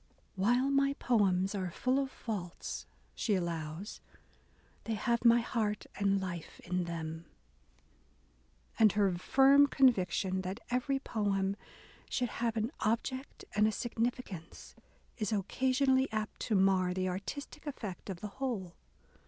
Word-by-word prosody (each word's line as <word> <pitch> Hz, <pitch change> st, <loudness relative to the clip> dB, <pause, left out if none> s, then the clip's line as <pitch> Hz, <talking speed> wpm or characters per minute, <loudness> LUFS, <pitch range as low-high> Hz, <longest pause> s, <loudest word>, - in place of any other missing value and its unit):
While 245 Hz, +8 st, +2 dB
my 275 Hz, 0 st, +3 dB
poems 195 Hz, -5 st, +2 dB
are 190 Hz, -3 st, -2 dB
full 255 Hz, +9 st, +1 dB
of 270 Hz, -1 st, -1 dB
faults," 200 Hz, -9 st, -5 dB, 0.3 s
she 210 Hz, -, 0 dB
allows,... 170 Hz, +1 st, -4 dB, 0.8 s
they 225 Hz, -, -1 dB
have 235 Hz, +3 st, 0 dB
my 235 Hz, 0 st, +6 dB
heart 215 Hz, -3 st, -1 dB
and 200 Hz, -1 st, +2 dB
life 180 Hz, -4 st, -6 dB
iu 180 Hz, 0 st, 0 dB
them." 165 Hz, -1 st, -5 dB, 1.5 s
And 215 Hz, -3 st, +6 dB
her 200 Hz, -3 st, +3 dB
firm 275 Hz, +7 st, +6 dB
conviction 190 Hz, -8 st, +2 dB
that 190 Hz, +4 st, -4 dB
every 255 Hz, +3 st, +1 dB
poem 200 Hz, -6 st, 0 dB, 0.5 s
should 245 Hz, -2 st, 0 dB
have 230 Hz, -1 st, 0 dB
an 220 Hz, +4 st, 0 dB
object 260 Hz, +5 st, -2 dB
and 210 Hz, +1 st, +4 dB
a -, -, +2 dB
significance," 230 Hz, -7 st, -4 dB, 0.5 s
is 215 Hz, -2 st, -1 dB
occasionally 260 Hz, +6 st, +2 dB
apt 215 Hz, -1 st, -3 dB
to 220 Hz, -, +2 dB
mar 190 Hz, -2 st, +3 dB
the 185 Hz, 0 st, 0 dB
artistic 200 Hz, +12 st, -5 dB
effect 210 Hz, -10 st, -6 dB
of 185 Hz, -3 st, -5 dB
the 210 Hz, -, -3 dB
whole. 215 Hz, -10 st, -2 dB
210 Hz, 130 wpm, -32 LUFS, 185-250 Hz, 1.5 s, my